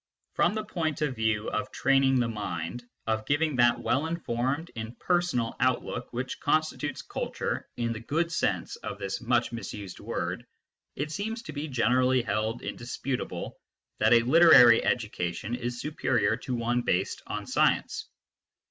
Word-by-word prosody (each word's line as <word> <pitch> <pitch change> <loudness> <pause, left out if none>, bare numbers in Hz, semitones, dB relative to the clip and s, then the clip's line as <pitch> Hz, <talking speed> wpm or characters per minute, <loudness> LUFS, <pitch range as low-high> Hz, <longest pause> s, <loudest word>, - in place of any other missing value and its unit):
From - - +2
the 215 - -2
point 160 -7 -2
of 140 -4 -1
view 110 -1 0
of 130 0 -2
training 135 -1 +3
the 120 - +2
mind, 100 -1 -4 0.2
of 110 -1 -1
giving 150 0 +1
that 120 -1 +4
well 145 +5 +1
informed, 145 0 -2
impersonal 120 +3 -1
outlook 130 -1 0
which 125 +2 -4
constitutes 155 -1 0
culture - - -4
in 115 -1 -1
the 110 - -6
good 160 +8 -1
sense - - -1
of - - -6
this 95 +4 -4
much 120 -1 +1
misused 105 -5 -7
word, - - -3 0.5
it 150 +2 -3
seems 220 +6 -3
to 155 - -8
be 145 +2 -4
generally 125 0 +2
held 110 +2 -2
indisputable 125 +2 -4 0.4
that 110 +1 +4
a 120 -1 +6
literary 125 -4 +8
education 105 -3 -2
is 120 0 -3
superior 120 -8 +1
to 125 +1 -4
one 120 +1 0
based 95 -5 0
on - - -4
science. - - +1
125 Hz, 150 wpm, -28 LUFS, 115-145 Hz, 0.5 s, literary